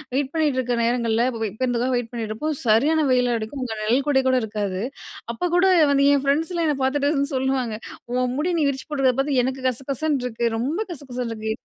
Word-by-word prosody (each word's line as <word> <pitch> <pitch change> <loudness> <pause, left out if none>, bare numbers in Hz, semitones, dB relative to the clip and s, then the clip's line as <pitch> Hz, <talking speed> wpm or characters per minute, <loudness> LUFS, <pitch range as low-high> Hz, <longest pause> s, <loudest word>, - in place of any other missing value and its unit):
Wait 275 0 0
பண்ணிட்டு 300 -5 +1
இருக்க 245 -1 0
நேரங்கள்ல, 235 -1 +1
இப்ப 225 -1 -7 0.2
பேருந்துக்காக 250 0 +1
வெயிட் 240 -1 -4
பண்ணிட்டு 225 -2 -4
இருப்போம். 300 +7 -2
சரியான 285 +8 +3
வெயில் 250 -1 +3
அடிக்கும். 225 +5 -5
அங்க 230 -3 -4
நிழல்குடை 265 +4 +2
கூட 260 - +3
இருக்காது. 205 -3 -3 0.5
அப்போ 235 - -3
கூட 355 - +4 0.3
வந்து, 280 0 +3
என் 275 - 0
ஃப்ரெண்ட்ஸ்லாம் 325 +4 +1
என்ன 295 - 0
பார்த்துட்டு 285 +2 +1
அதான் 280 -1 -1
சொல்லுவாங்க, 260 -3 0 0.4
"உன் 250 -1 0
முடி 325 +5 0
நீ - - +2
விரிச்சி 265 -1 -5
போடுறத 270 -3 +2
பார்த்து, 275 -1 +1
எனக்கு 260 +1 -3
கசகசன்னு 275 +2 -2
இருக்கு. 235 -1 -2
ரொம்ப 280 - -1
கசகசன்னு 250 -6 -5
இருக்கு" 220 0 -3
260 Hz, 190 wpm, -23 LUFS, 235-285 Hz, 0.5 s, கூட